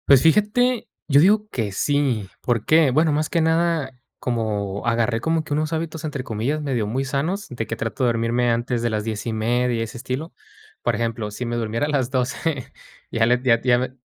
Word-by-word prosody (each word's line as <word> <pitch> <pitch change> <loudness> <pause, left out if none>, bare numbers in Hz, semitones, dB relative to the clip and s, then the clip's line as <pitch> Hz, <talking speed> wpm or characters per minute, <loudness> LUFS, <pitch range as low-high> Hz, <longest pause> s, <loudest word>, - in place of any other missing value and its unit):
Pues 135 -2 +7
fíjate, 210 +8 +3 0.2
yo 140 -1 +5
digo 210 +4 +4
que 110 -5 -2
sí, 130 -2 0
¿por 115 -3 0
qué? 155 -2 +5
Bueno, 155 +4 +3
más 150 +1 0
que 170 - +1
nada, 160 -3 +1 0.3
como 105 -5 -2
agarré 115 -1 +1
como 160 +2 +1
que 150 - -4
unos 155 +2 -1
hábitos, 160 0 -3
entre 145 -4 -3
comillas, 125 +7 -2
medio 125 -7 -1
muy 130 +5 -1
sanos, 155 +10 -2
de 115 -4 -4
que 115 - -3
trato 115 +3 -3
de - - +4
dormirme 120 +1 +1
antes 120 +1 0
de 120 - +1
las 105 -1 -1
10 110 -1 -4
y - - 0
media, 120 +1 +1
ese 115 - -7
estilo. 130 +6 -4 0.5
Por 120 - +1
ejemplo, 115 -1 -2
si 105 +4 -5
me 120 0 -2
durmiera 115 +3 -1
a - - -3
las 135 -4 0
12, 130 +2 -2 0.4
ya 115 -1 +2
le 125 +1 +3
ya 115 -3 +4
ya 125 -1 +4
me 130 +1 -2
125 Hz, 210 wpm, -22 LUFS, 115-155 Hz, 0.5 s, Pues